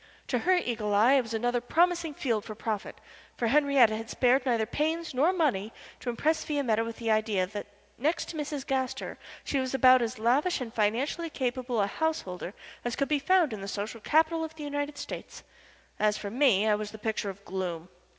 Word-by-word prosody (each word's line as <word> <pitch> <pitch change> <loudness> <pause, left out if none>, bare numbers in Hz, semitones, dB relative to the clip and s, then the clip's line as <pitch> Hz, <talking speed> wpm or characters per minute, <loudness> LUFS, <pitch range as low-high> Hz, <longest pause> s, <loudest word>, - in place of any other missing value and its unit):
To - - +1
her 370 +1 +3
eagle 225 - -1
eye 225 +6 +6
it 275 - +5
was 230 -2 -7
another 245 +2 0
promising 335 +3 +1
field 230 -7 -1
for 215 - -8
profit, 215 -1 -4 0.4
for 235 - 0
Henriette 280 -4 +5
had 225 +1 -4
spared 255 +1 +2
neither 230 -3 +2
pains 320 +6 -2
nor 290 +8 +3
money 255 - 0 0.3
to 250 - -4
impress 315 +7 +1
Fiametta 250 -7 0
with 230 0 -6
the 230 -2 -1
idea 215 -3 +2
that 205 +2 -7 0.3
next 305 +7 0
to - - -6
Mrs. 295 -2 -4
Gaster 265 -2 -2 0.2
she 275 - -1
was 260 0 -2
about 255 0 +6
as 235 +1 -2
lavish 270 +11 +2
and 235 -3 -6
financially 250 +10 0
capable 250 -4 -1
a - - +3
householder 200 - -3 0.3
as 240 -1 -2
could 275 +1 -1
be 300 -1 +2
found 350 -4 +3
in 210 - -6
the 195 - -6
Social 210 +3 -4
Capital 320 +5 +2
of 320 0 -6
the 310 - -8
United 290 0 -3
States. - - -7 0.6
As 210 0 +2
for 200 - -5
me, 230 -5 +3
I 215 - +4
was 210 0 -2
the 220 - -10
picture 215 -1 -2
of 195 +1 -10
gloom. 180 -3 -4
245 Hz, 200 wpm, -29 LUFS, 215-295 Hz, 0.6 s, eye